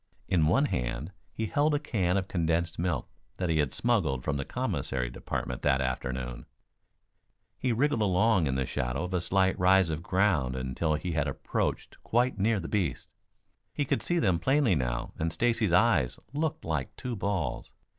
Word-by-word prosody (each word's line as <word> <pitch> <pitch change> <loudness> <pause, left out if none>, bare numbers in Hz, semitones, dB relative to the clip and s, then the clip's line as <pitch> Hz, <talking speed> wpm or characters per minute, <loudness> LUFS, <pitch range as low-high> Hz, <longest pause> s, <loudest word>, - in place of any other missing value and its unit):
In 85 -4 +3
one 135 - +4
hand 60 - -2 0.2
he 110 - -3
held 145 +7 +2
a - - +1
can 100 - 0
of 95 -1 -1
condensed 85 -1 0
milk 85 -6 -1 0.3
that 90 -2 -1
he 80 -1 +2
had 75 -3 +1
smuggled 90 - +1
from 75 - -1
the 70 - -2
commissary 65 -2 -2
department 60 0 -4
that 65 - +3
afternoon. 65 -1 -3 1.1
He 130 - 0
wriggled 125 +1 +1
along 100 -2 +3
in 65 - 0
the 65 0 0
shadow 60 +4 -2
of 90 +1 -4
a 90 - +1
slight 95 +1 +1
rise 90 -1 +4
of 80 +1 -3
ground 85 -9 +1
until 65 +5 -1
he 85 +3 -3
had 75 -2 0
approached 65 - -3
quite 120 -2 +1
near 110 +1 +2
the 85 - -5
beasts. 90 - -2 0.6
He 145 - 0
could - - 0
see 175 - 0
them 95 - +2
plainly 135 0 +3
now 60 -5 -2
and 80 +1 0
Stacy's 115 0 +1
eyes 85 - +3 0.2
looked 155 +1 -2
like 75 -5 -2
two 125 -2 -4
balls. 100 -5 -2
90 Hz, 175 wpm, -29 LUFS, 70-110 Hz, 1.1 s, one